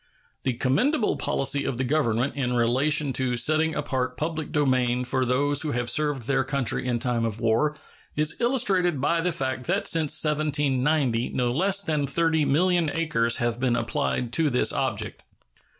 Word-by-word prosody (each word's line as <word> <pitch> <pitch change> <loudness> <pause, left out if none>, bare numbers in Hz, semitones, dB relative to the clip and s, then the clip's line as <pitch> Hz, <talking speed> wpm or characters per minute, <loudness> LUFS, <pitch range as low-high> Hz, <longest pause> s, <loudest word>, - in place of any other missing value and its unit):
The 130 - -1
commendable 210 - +1
policy 140 +1 0
of 130 - -3
the 130 - -1
Government 130 -2 0
in 125 -3 -1
relation 135 +4 +1
to 125 -2 0
setting 155 +5 +2
apart 130 -3 -2
public 160 0 -4
domain 125 -4 +1
for 130 +1 0
those 140 +3 +1
who 155 -2 -2
have 120 -1 -1
served 145 -3 0
their 135 +2 0
country 130 -2 -2
in 120 -1 0
time 120 -1 -1
of 110 -1 -2
war 120 +7 +1 0.4
is 150 +1 0
illustrated 195 - +1
by 165 +5 +1
the 180 +1 0
fact 130 -5 -3
that 190 +4 0
since 155 -3 +2
1790 145 -4 0
no 125 -1 0
less 195 +8 +1
than 150 -5 -1
30,000,000 165 +2 +1
acres 115 -8 +1
have 120 0 -2
been 125 -2 +1
applied 120 -1 -2
to 160 0 +2
this 125 -2 +1
object. - - -3
140 Hz, 165 wpm, -25 LUFS, 125-155 Hz, 0.4 s, setting